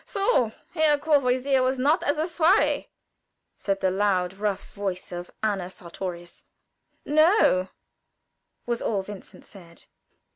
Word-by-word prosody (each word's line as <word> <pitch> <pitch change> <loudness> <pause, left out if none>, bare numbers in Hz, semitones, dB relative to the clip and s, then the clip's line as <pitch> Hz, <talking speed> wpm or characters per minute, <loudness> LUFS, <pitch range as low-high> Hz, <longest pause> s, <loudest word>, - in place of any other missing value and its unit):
"So 390 - +1 0.2
Herr 315 -3 +3
Courvoisier 275 -3 +2
was 260 +1 +1
not 290 +7 +2
at 290 - 0
the 310 - -1
soirée," 345 +4 +2 0.7
said 195 -1 -2
the 190 - +2
loud, 190 -2 +1
rough 200 0 -3
voice 195 -2 -4
of 175 0 -6
Anna 195 -4 -1
Sartorius. 175 -1 -8 0.6
"No," 310 - +4 1.0
was 235 -1 -2
all 200 -3 -1
Vincent 200 0 -11
said. 170 -4 -14
215 Hz, 120 wpm, -25 LUFS, 185-295 Hz, 1.0 s, No